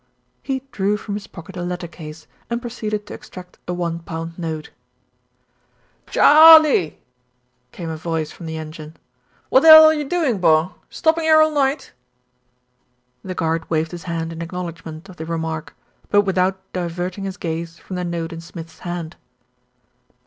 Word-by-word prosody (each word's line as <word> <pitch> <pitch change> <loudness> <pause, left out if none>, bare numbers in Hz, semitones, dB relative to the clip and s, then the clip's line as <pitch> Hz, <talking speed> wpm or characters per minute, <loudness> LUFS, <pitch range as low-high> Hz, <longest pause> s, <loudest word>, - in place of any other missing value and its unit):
He 265 -1 -3
drew 200 +1 0
from 210 -1 -6
his 205 -1 -5
pocket 175 +1 -12
a 180 - -5
letter 175 0 -4
case, 160 -1 -11 0.2
and 235 0 -1
proceeded 215 -3 -4
to - - -9
extract 180 -1 -12
a 180 - -2
one 170 -1 -2
pound 165 +1 -7
note. 160 -3 -5 1.4
"Chaaaaaaaaaarley 310 - +7 0.4
!" 125 0 -46
came 170 -2 -7
a 160 - -5
voice 160 -1 -3
from 170 - -10
the 160 0 -5
engine. 155 0 -9 0.5
"Wot 260 - +6
the 325 - +3
'ell 315 0 +12
are 315 - +6
you 300 -1 -2
doin', 305 - 0
bor? 160 +1 +3 0.2
Stoppin' 325 0 +1
'ere 315 0 +6
all 310 - +1
night?" 275 -1 0 1.3
The 185 -1 -6
guard 165 0 -1
waved 160 0 0
his 175 -1 -8
hand 165 -1 -3
in 165 - -7
acknowledgment 170 -1 -7
of 185 -2 -13
the 160 - -6
remark; 160 -1 -4 0.3
but 205 - +5
without 190 -1 +1 0.2
diverting 180 +2 -4
his 190 -1 -5
gaze 165 0 -5
from 190 - -8
the 180 - -3
note 170 -1 -4
in 165 - -7
Smith's 165 0 -11
hand. 175 -2 -6
175 Hz, 165 wpm, -21 LUFS, 165-205 Hz, 1.4 s, ell